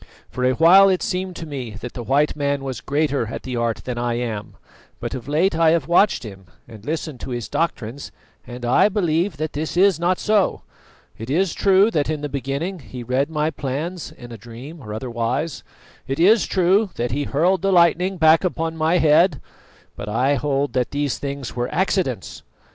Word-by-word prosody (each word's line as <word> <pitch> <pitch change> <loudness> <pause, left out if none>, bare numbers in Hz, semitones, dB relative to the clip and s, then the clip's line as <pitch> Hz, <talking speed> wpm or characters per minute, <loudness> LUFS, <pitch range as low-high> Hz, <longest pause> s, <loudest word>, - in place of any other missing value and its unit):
For 125 - -4
a 130 0 +3
while 185 +7 +7
it 185 -1 +1
seemed 185 0 -3
to 165 - -6
me 130 -8 -6
that 125 +1 -7
the 120 - -6
white 140 +5 +1
man 140 -1 -1
was 130 -4 -5
greater 145 -4 0
at - - -6
the 130 -1 -4
art 115 -1 -1
than 125 -2 -3
I 120 -1 -1
am; 115 -4 -4 0.4
but - - -5
of 130 -2 -6
late 160 +5 +1
I 165 0 +4
have 160 -3 +1
watched 175 +1 +3
him 95 -4 -10 0.2
and 110 -3 -13
listened 155 -1 -4
to - - -7
his 120 -2 -4
doctrines, 140 -5 -3 0.4
and 120 0 -7
I 125 +11 +4
believe 175 -4 0
that 155 +1 -3
this 155 +3 -4
is 190 -3 +4
not 175 +2 +1
so. 210 -3 +1 0.6
It 115 +3 -7
is 175 +5 +1
true 195 +2 +4
that 150 -5 0
in 155 -2 -2
the 150 - -4
beginning 140 +7 -3
he 125 -3 -9
read 130 +5 0
my 155 0 -1
plans 155 +5 -4
in 120 0 -12
a 115 - -9
dream, 125 +9 -10
or 105 - -9
otherwise; 120 +6 -3 0.5
it 135 +3 -3
is 205 +6 +5
true 190 +3 +2
that 120 0 -2
he 145 +3 -1
hurled 175 +7 +1
the 195 - +1
lightning 180 +1 +3
back 160 +1 +5
upon 165 -2 -2
my 160 +2 +2
head; 160 -1 +4 0.6
but - - -6
I 130 +6 +2
hold 140 0 -1
that 125 -2 0
these 145 -2 -2
things 140 -4 -5
were 120 0 -2
accidents. 175 - -1
145 Hz, 200 wpm, -21 LUFS, 125-170 Hz, 0.6 s, while